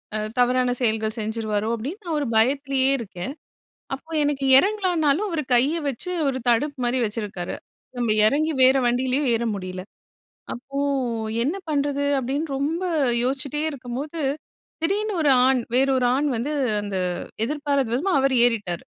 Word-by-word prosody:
அ -, -, +1 dB, 0.2 s
தவறான 250 Hz, 0 st, +3 dB
செயல்கள் 220 Hz, -1 st, 0 dB
செஞ்சுருவாரோ 215 Hz, -1 st, -2 dB
அப்டீன்னு, 285 Hz, -, -6 dB
நான் 320 Hz, -3 st, -1 dB
ஒரு 285 Hz, -, -2 dB
பயத்திலேயே 270 Hz, +3 st, +2 dB
இருக்கேன். 200 Hz, +3 st, -6 dB, 0.6 s
அப்போ 320 Hz, +4 st, -16 dB
எனக்கு 285 Hz, -2 st, -1 dB
இறங்கலானாலும், 365 Hz, -1 st, +2 dB
அவர் 330 Hz, -4 st, -1 dB
கைய 265 Hz, +7 st, +3 dB
வச்சு 275 Hz, +8 st, -6 dB, 0.2 s
ஒரு 260 Hz, -1 st, 0 dB
தடுப்பு 280 Hz, +5 st, +1 dB
மாரி 245 Hz, +1 st, +1 dB
வச்சுருக்காரு. 210 Hz, -4 st, -4 dB, 0.4 s
நம்ம 240 Hz, -2 st, 0 dB, 0.2 s
இறங்கி 305 Hz, +8 st, +2 dB
வேற 260 Hz, +1 st, +6 dB
வண்டியிலேயும் 255 Hz, +3 st, +1 dB
ஏற 230 Hz, +1 st, 0 dB
முடியல. 185 Hz, -1 st, -6 dB, 0.7 s
அப்போ 275 Hz, +3 st, -6 dB, 0.6 s
என்ன 310 Hz, +10 st, -1 dB
பண்றது? 285 Hz, -1 st, 0 dB
அப்டின்னு 275 Hz, +4 st, -2 dB
ரொம்ப 310 Hz, +6 st, -1 dB, 0.4 s
யோசிச்சிட்டே 275 Hz, +3 st, -2 dB
இருக்கும்போது, 275 Hz, +4 st, -6 dB, 0.6 s
திடீர்னு 410 Hz, +4 st, 0 dB
ஒரு 290 Hz, -, +4 dB, 0.2 s
ஆண், 265 Hz, -1 st, +3 dB
வேற 270 Hz, +2 st, +3 dB
ஒரு 250 Hz, -, +2 dB
ஆண் 290 Hz, +2 st, +1 dB
வந்து, 245 Hz, +6 st, -2 dB, 0.3 s
அந்த 205 Hz, -2 st, -4 dB, 0.5 s
எதிர்பாரத 285 Hz, 0 st, 0 dB
விதமா 360 Hz, +10 st, 0 dB
அவரு 270 Hz, -1 st, +2 dB
ஏறிட்டாரு. 205 Hz, -8 st, -2 dB
270 Hz, 140 wpm, -23 LUFS, 235-295 Hz, 0.7 s, வேற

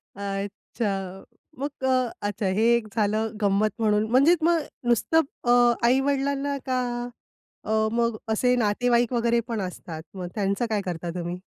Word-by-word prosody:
अच्छा. 200 Hz, +2 st, -4 dB, 0.7 s
मग 285 Hz, +2 st, -1 dB, 0.2 s
अ, 255 Hz, -2 st, +2 dB, 0.2 s
अच्छा 205 Hz, 0 st, -3 dB
हे 220 Hz, +2 st, +2 dB
एक 225 Hz, -2 st, -2 dB
झालं 215 Hz, +1 st, +1 dB
गंमत 205 Hz, +1 st, +3 dB
म्हणून. 210 Hz, -1 st, +2 dB
म्हणजेच 290 Hz, +7 st, +5 dB
मग 340 Hz, -1 st, +4 dB, 0.3 s
नुसतं 320 Hz, +7 st, +3 dB, 0.2 s
अ, 240 Hz, -, +2 dB, 0.4 s
आई-वडिलांना 280 Hz, +2 st, +1 dB
का 255 Hz, -1 st, 0 dB, 0.8 s
अ, 215 Hz, -, -4 dB, 0.2 s
मग 235 Hz, -1 st, 0 dB
असे 250 Hz, +3 st, +2 dB
नातेवाईक 240 Hz, +2 st, +2 dB
वगैरे 235 Hz, 0 st, +2 dB
पण 230 Hz, -4 st, -2 dB
असतात. 170 Hz, -3 st, -6 dB
मग 180 Hz, -2 st, -5 dB
त्यांचं 200 Hz, +3 st, 0 dB
काय 210 Hz, -2 st, 0 dB
करता 175 Hz, -1 st, -4 dB
तुम्ही? 175 Hz, 0 st, -4 dB
225 Hz, 140 wpm, -25 LUFS, 200-255 Hz, 0.8 s, म्हणजेच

